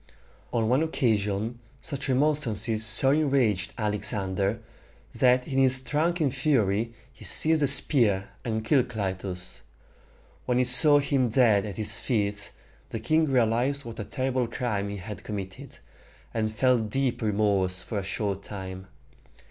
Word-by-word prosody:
On 115 -2 -1
one 130 +5 +2
occasion 110 -7 -1 0.2
such 140 -2 -6
remonstrances 125 -6 0
so 135 +4 +8
enraged 130 -9 0
Alexander, 105 -2 -1 0.5
that 125 0 +2
in 135 -1 -1
his 130 0 +5
drunken 155 +2 -1
fury 115 -6 0 0.2
he 115 - -16
seized 160 0 +5
a 145 - +2
spear 115 -8 +3
and 110 -2 -3
killed 130 -1 +2
Clytus. 95 -4 -6 0.9
When 125 - +1
he 125 - +3
saw 145 +4 +6
him 140 -3 0
dead 110 -4 +2
at 100 - -8
his 110 0 +1
feet, 105 -4 -2 0.4
the 115 - -5
king 155 +8 +1
realized 130 +2 0
what 115 -1 -9
a - - -3
terrible 130 +1 -2
crime 105 -4 -3
he 100 - -6
had 100 +2 -9
committed, 95 -2 -8 0.6
and 110 -1 -2
felt 120 -1 +1
deep 130 +2 -2
remorse 100 -4 0
for 105 - -4
a - - -6
short 100 0 -3
time. 95 -2 -9
115 Hz, 140 wpm, -26 LUFS, 100-130 Hz, 0.9 s, so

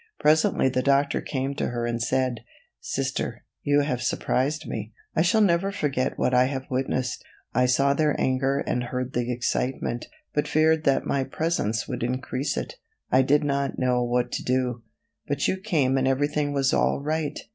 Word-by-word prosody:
Presently 155 -3 +3
the 130 0 +1
doctor 140 +2 +2
came 135 0 -2
to 140 - -2
her 120 -1 -2
and 120 0 -2
said: 130 -1 0 0.4
"Sister, 470 0 -3 0.2
you 145 0 +3
have 130 -4 -1
surprised 140 +5 0
me. 110 0 -5 0.2
I - - +3
shall 185 +6 +3
never 195 0 +3
forget 140 -8 -1
what 125 - +1
I 125 0 +5
have 135 0 -3
witnessed. 130 -1 -1 0.3
I 125 +1 +3
saw 135 +2 +3
their 150 0 +1
anger 135 +2 +1
and 125 0 -1
heard 125 +1 -4
the 120 0 -1
excitement, 125 0 -2 0.3
but 150 - 0
feared 160 0 +3
that 135 -2 +2
my 140 -1 0
presence 130 -9 -1
would 125 -3 -4
increase 130 +3 -2
it. - - -4 0.3
I 130 - +6
did 145 +3 +3
not 140 -1 -1
know 125 -1 +2
what 120 0 0
to - - -3
do, 125 -2 0 0.5
but 145 0 0
you - - +1
came 150 -10 +1
and 130 - +1
everything 145 +2 +1
was 140 -1 +1
all - - +2
right. 150 0 -2
135 Hz, 180 wpm, -25 LUFS, 125-145 Hz, 0.5 s, I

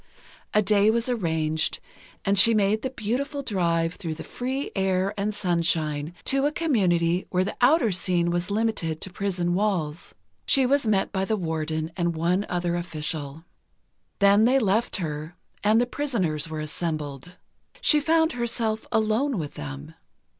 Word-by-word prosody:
A 210 - +3
day 205 +1 +4
was 230 +2 +1
arranged, 160 -8 0 0.5
and 200 0 +3
she 230 +2 +7
made 210 +1 +2
the 260 - -2
beautiful 265 +5 -3
drive 170 -7 0
through 160 -3 -5
the 160 - -8
free 265 +3 -4
air 190 0 +1
and 205 +1 -1
sunshine, 165 -5 -1
to 275 +1 +2
a - - -1
community 185 - +1
where 185 0 +1
the 195 - -4
outer 245 -3 +4
scene 175 -1 +1
was 175 +2 -1
limited 205 -7 -1
to 190 - -6
prison 180 -3 -1
walls. 175 -6 -1 0.3
She 270 -2 +4
was 275 -1 +2
met 200 -3 +1
by 190 -1 -1
the 215 +2 0
Warden 160 -2 -2
and 170 -2 -1
one 175 +5 0
other 175 -1 -1
official. 155 -3 -4 0.7
Then 200 +2 +5
they 255 +3 +4
left 225 -1 +1
her, 155 -2 -4 0.3
and 215 +2 +4
the 245 - +3
prisoners 190 - -1
were 155 -1 -4
assembled. 155 0 -4 0.4
She 300 - +4
found 320 +2 +2
herself 230 -3 -1
alone 220 +4 +1
with 150 -4 -4
them. 70 -1 -8
190 Hz, 155 wpm, -25 LUFS, 165-225 Hz, 0.7 s, she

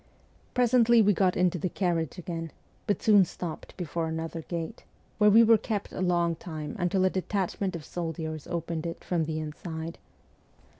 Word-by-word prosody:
Presently 240 -1 +5
we 205 0 +4
got 185 -1 +2
into 180 -1 +2
the 185 - -1
carriage 170 -4 -1
again, 165 -2 -5 0.4
but 205 - 0
soon 205 -3 +7
stopped 170 -1 -7
before 170 -2 -2
another 160 +1 -4
gate, 170 +6 -5 0.4
where 210 0 +6
we 225 +3 +8
were 225 -1 +6
kept 210 -3 -3
a - - -5
long 175 -2 +2
time 155 +1 -6
until 185 +1 +2
a - - +4
detachment 190 0 -1
of 160 -3 -7
soldiers 160 -3 -4
opened 165 -1 -3
it 165 - -6
from 170 -3 0
the 155 0 -3
inside. 160 +1 -6
175 Hz, 165 wpm, -28 LUFS, 160-195 Hz, 0.4 s, we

